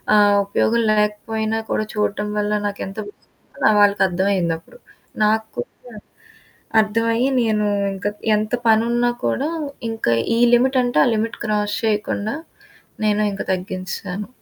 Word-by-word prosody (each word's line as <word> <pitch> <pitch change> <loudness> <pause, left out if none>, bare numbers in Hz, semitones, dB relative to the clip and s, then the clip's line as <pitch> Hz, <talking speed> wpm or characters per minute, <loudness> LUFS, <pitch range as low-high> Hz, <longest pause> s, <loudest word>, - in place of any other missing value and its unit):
ఆహ్, 205 -1 +5
ఉపయోగం 230 +3 +1
లేకపోయినా 215 +1 -1
కూడా 215 - 0
చూడడం 210 0 -1
వల్ల 210 0 -1 0.2
నాకెంతో 200 +1 -5 0.8
వాళ్ళకర్థమయిందప్పుడు. 190 - +1 0.5
నాకు 220 +1 0
కూడా 120 - -3 1.1
అర్థమయ్యి 230 +4 +1
నేను 215 -2 +1 0.3
ఇంకా 195 +1 -2 0.3
ఎంత 215 +2 -2
పనినున్నా 235 +2 +3
కూడా 285 +4 0 0.4
ఇంకా 220 - 0 0.2
ఈ - - +2 0.2
లిమిట్ 260 +2 +2
అంటే 245 0 +1
ఆ - - +2
లిమిట్ 225 +1 -2
క్రాస్ 210 -1 0
చేయకుండా 210 +1 -1 0.7
నేను 210 0 +2
ఇంకా 195 - -4
తగ్గించేశాను. 185 +1 -5
210 Hz, 110 wpm, -20 LUFS, 200-225 Hz, 1.1 s, ఆహ్